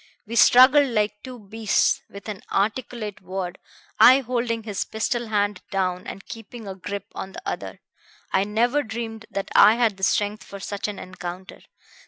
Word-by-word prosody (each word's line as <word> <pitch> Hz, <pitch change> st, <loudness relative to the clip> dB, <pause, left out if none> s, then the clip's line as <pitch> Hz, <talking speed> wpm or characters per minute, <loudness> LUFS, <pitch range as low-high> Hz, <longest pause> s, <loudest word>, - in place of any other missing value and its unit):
We 230 Hz, +2 st, -6 dB
struggled 265 Hz, +5 st, +7 dB
like 210 Hz, -2 st, 0 dB
two 255 Hz, -1 st, -9 dB
beasts, 215 Hz, 0 st, +1 dB
without 200 Hz, +1 st, -7 dB
an -, -, -19 dB
articulate 215 Hz, 0 st, -2 dB
word, 185 Hz, -1 st, -5 dB, 0.4 s
I 260 Hz, +2 st, +8 dB
holding 235 Hz, -2 st, -2 dB
his 210 Hz, -3 st, -2 dB
pistol 235 Hz, +2 st, -2 dB
hand 205 Hz, -2 st, 0 dB
down 185 Hz, -2 st, -1 dB
and 195 Hz, -, -8 dB
keeping 225 Hz, 0 st, -9 dB
a 195 Hz, -, -4 dB
grip 200 Hz, +2 st, -6 dB
on 190 Hz, 0 st, -7 dB
the -, -, -8 dB
other. -, -, -5 dB, 0.5 s
I 190 Hz, -, +3 dB
never 235 Hz, +7 st, +1 dB
dreamed 225 Hz, -2 st, -6 dB
that 195 Hz, -, -4 dB
I 215 Hz, -, +7 dB
had 230 Hz, -4 st, +1 dB
the 190 Hz, -, -11 dB
strength 205 Hz, +2 st, +1 dB
for 200 Hz, -, -10 dB
such 200 Hz, +1 st, -4 dB
an 205 Hz, -2 st, -5 dB
encounter. 185 Hz, +1 st, -8 dB
210 Hz, 170 wpm, -24 LUFS, 195-235 Hz, 0.5 s, I